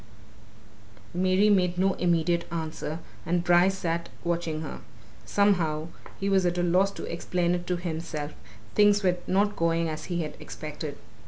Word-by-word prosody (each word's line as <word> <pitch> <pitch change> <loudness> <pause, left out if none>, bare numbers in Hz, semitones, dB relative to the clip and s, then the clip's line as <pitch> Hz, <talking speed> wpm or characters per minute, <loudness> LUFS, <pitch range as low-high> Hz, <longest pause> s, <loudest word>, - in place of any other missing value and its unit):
Mary 185 +3 +3
made 180 -4 +3
no 190 +1 +3
immediate 170 -1 +1
answer, 160 -1 -3 0.3
and 175 0 0
Bryce 175 +2 +4
sat 170 -2 -2
watching 170 -2 -1
her. 155 - -6 0.5
Somehow 170 -6 +2 0.3
he 195 - -1
was 195 -1 +3
at 175 0 +1
a 175 - +1
loss 180 +3 +3
to - - -7
explain 175 +1 -1
it 175 0 -3
to 180 - 0
himself 160 -3 -4 0.4
things 205 0 +5
were 180 -1 +3
not 205 +2 +2
going 165 0 +1
as 155 0 -5
he 175 -2 -1
had 150 - -6
expected. - - -6
175 Hz, 155 wpm, -27 LUFS, 165-185 Hz, 0.5 s, things